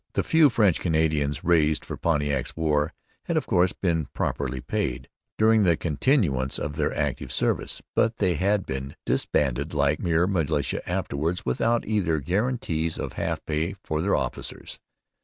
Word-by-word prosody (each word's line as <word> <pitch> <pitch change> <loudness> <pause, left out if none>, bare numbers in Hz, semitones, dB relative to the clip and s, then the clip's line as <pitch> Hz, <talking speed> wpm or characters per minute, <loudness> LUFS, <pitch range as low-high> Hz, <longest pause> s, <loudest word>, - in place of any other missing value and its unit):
The - - +1
few 160 -2 +5
French 105 -8 +3
Canadians 80 -3 0
raised 80 -3 +2
for - - -5
Pontiac's 75 -5 -1
war 75 -2 +1 0.3
had - - 0
of - - 0
course 90 0 +3
been 80 -5 -1
properly 65 -2 -2
paid 65 - -2 0.3
during 110 0 +5
the 85 -5 +3
continuance 75 - +1
of 75 0 -4
their 75 -1 0
active - - -2
service. - - -1
But 115 +1 +2
they 95 -5 +2
had 95 +4 +1
been 65 +1 -5
disbanded 70 +3 0
like 70 +1 +2
mere 85 -1 +2
militia 80 -6 0
afterwards, 80 +6 -2
without 115 - +1
either 95 -7 +1
gratuities 90 - -1
or - - -3
half - - -3
pay 80 +5 -1
for 75 0 -2
the 100 +4 0
officers. - - -4
80 Hz, 155 wpm, -25 LUFS, 75-95 Hz, 0.3 s, few